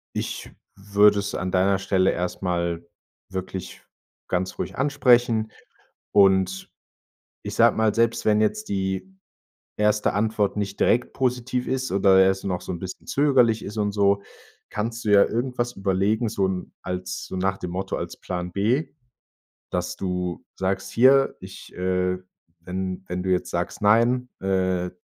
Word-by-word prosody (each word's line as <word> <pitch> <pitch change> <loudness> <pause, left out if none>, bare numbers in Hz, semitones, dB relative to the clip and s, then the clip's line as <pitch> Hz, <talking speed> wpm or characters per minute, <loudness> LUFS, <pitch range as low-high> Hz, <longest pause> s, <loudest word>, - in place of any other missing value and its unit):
ich - - -4 0.3
würde 100 +1 +4
es 100 0 -3
an 95 - -2
deiner 95 +1 +2
Stelle 95 -1 +2
erstmal 85 -1 -2 0.4
wirklich 95 -1 -6 0.5
ganz 90 0 -2
ruhig - - -4
ansprechen. 125 -5 +3 0.6
Und 95 -1 +3 0.7
ich - - -5
sage - - +5
mal, 110 -1 +2
selbst 115 0 +1
wenn 105 0 +4
jetzt 215 - -1
die 95 - -3 0.6
1. 105 0 +2
Antwort 105 0 0
nicht 100 -1 -3
direkt 120 +2 +2
positiv 125 -1 -1
ist 130 0 -2
oder 95 0 +5
erst 95 0 +1
noch 90 -2 -2
so - - -6
'n 85 - -5
bisschen 95 0 -8
zögerlich 125 -6 +3
ist 105 +2 -7
und 105 -1 0
so, 100 -1 +2 0.5
kannst 115 +2 -4
du - - 0
ja 100 -1 +7
irgendwas 120 +1 -2
überlegen, 100 +4 +1
so 100 -3 0
'n 95 -1 -4
als 90 0 -4
so - - -7
nach 95 +1 0
dem 90 - -6
Motto 95 +2 -3
als - - -5
Plan 90 -1 -5
B, 115 - 0 0.8
dass - - -2
du 90 -2 -3
sagst: 95 +1 -2
„Hier, 135 +3 +5
ich, - - -11
äh 90 0 0 0.5
wenn 95 0 -4
wenn 90 +1 -3
du 95 - -2
jetzt 90 -1 0
sagst, - - -3
nein, 120 +4 +3
äh, 95 -2 0
100 Hz, 150 wpm, -24 LUFS, 95-115 Hz, 0.8 s, ja